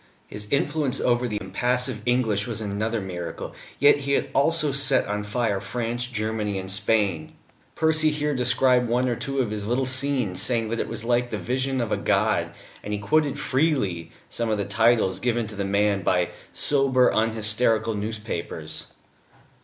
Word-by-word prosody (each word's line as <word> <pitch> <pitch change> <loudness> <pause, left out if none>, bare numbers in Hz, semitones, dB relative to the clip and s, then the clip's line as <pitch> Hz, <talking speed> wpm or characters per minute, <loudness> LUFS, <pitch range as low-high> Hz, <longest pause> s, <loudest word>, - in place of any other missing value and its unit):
His 105 0 -5
influence 145 -1 0
over 125 0 +1
the 105 -3 -3
impassive 125 +4 -1
English 115 -4 +1
was 115 -2 -3
another 110 +2 -2
miracle, 85 -4 -6 0.2
yet 145 +1 +6
he 140 0 -2
had - - 0
also 155 0 +2
set 140 +1 +2
on 105 +1 -2
fire 105 -2 -1
France, 120 +4 -3
Germany, 110 -3 -2
and 95 0 -3
Spain. 95 -4 0 0.4
Percy 155 0 +3
here 150 0 -1
described 125 -1 +3
one 125 +2 +1
or 120 - 0
two 135 +4 -4
of 115 -5 -2
his 105 -1 -4
little 125 +3 +1
scenes, 130 -7 +1
saying 115 -3 +1
that 115 +1 -2
it - - -1
was 115 -1 -4
like 120 +1 +1
the - - -3
vision 130 +1 -1
of 115 -3 -2
a - - +1
god: - - +1 0.3
and 105 - -4
he - - 0
quoted 150 +6 +1
freely 130 - 0 0.2
some 115 -1 -3
of 110 - +1
the 100 - -1
titles 105 -2 +2
given 120 -1 0
to 105 0 -9
the 100 0 -2
Man 100 0 +1
by 90 -1 +1 0.2
sober, 135 -3 +2
unhysterical 110 0 +1
newspapers. 105 -7 -5
115 Hz, 170 wpm, -24 LUFS, 105-130 Hz, 0.4 s, yet